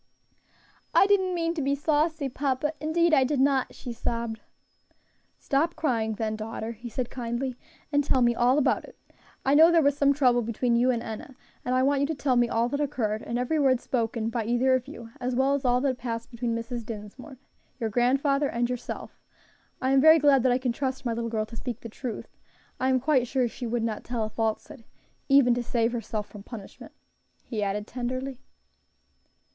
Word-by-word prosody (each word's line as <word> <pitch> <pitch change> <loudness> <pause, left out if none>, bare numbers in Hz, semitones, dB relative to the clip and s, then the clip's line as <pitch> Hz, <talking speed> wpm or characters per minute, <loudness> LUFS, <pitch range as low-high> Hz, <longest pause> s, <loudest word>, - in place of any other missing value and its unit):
"I - - +7
did 405 0 +4
not 370 -1 -2
mean 335 -1 0
to 325 - -3
be 280 +1 +1
saucy, 305 0 0
papa, 275 +3 -1
indeed 330 +2 +2
I 270 - +6
did 275 +1 0
not," 270 -1 +2
she 245 -3 -7
sobbed. 230 -1 -3 1.0
"Stop 320 +5 0
crying 225 -7 0
then, 215 0 -2
daughter," 220 +1 -5
he 235 +1 -9
said 245 +1 -4
kindly, 245 +1 -3 0.4
"and 290 -1 +3
tell 260 -3 +2
me 240 0 +4
all 245 +3 +3
about 295 - +2
it. - - -14 0.5
I 270 - +3
know 320 +3 +8
there 335 -2 +4
was 285 0 +3
some 280 -1 +3
trouble 255 -4 +3
between 235 +1 0
you 245 +2 +3
and 235 -2 0
Enna, 225 +3 -7 0.3
and 250 - 0
I 255 - +3
want 280 0 +2
you 280 - +2
to 320 - -2
tell 270 -2 +1
me 240 -1 +3
all 230 +1 +1
that 285 +3 -2
occurred, 225 -7 -1
and 235 - -3
every 250 +6 0
word 265 -3 +3
spoken 230 -2 -1
by 230 -1 -1
either 245 +3 +2
of 255 0 0
you, 235 -6 -10
as 250 0 -2
well 265 +2 +3
as 280 -1 -2
all 245 0 +3
that 260 -2 0
passed 230 -1 -5
between 235 -1 -2
Mrs. 230 +1 -4
Dinsmore, 225 +5 -9 0.4
your 225 -3 -2
grandfather, 275 +4 +2
and 240 +1 0
yourself. 250 -1 -6 0.6
I 260 0 0
am 270 0 +5
very 315 +2 +8
glad 285 -3 +5
that 255 0 +3
I 245 - +3
can 255 -1 -1
trust 265 +1 -3
my 235 - 0
little 230 0 -3
girl 220 -1 -1
to 230 - -11
speak 240 0 -5
the 230 - -7
truth. 235 +1 -7 0.4
I 260 - +1
am 260 -1 +3
quite 260 -2 +2
sure 255 0 +1
she 240 +1 -6
would 235 0 -1
not 220 -2 -3
tell 240 -2 -2
a 215 - -4
falsehood 230 +5 -3 0.5
even 270 -3 +6
to 245 - -1
save 235 -1 0
herself 220 -3 -4
from 205 - -11
punishment," 205 -1 -11 0.5
he 220 -4 -4
added 205 +1 -1
tenderly. 255 +2 -4
250 Hz, 205 wpm, -27 LUFS, 230-275 Hz, 1.0 s, know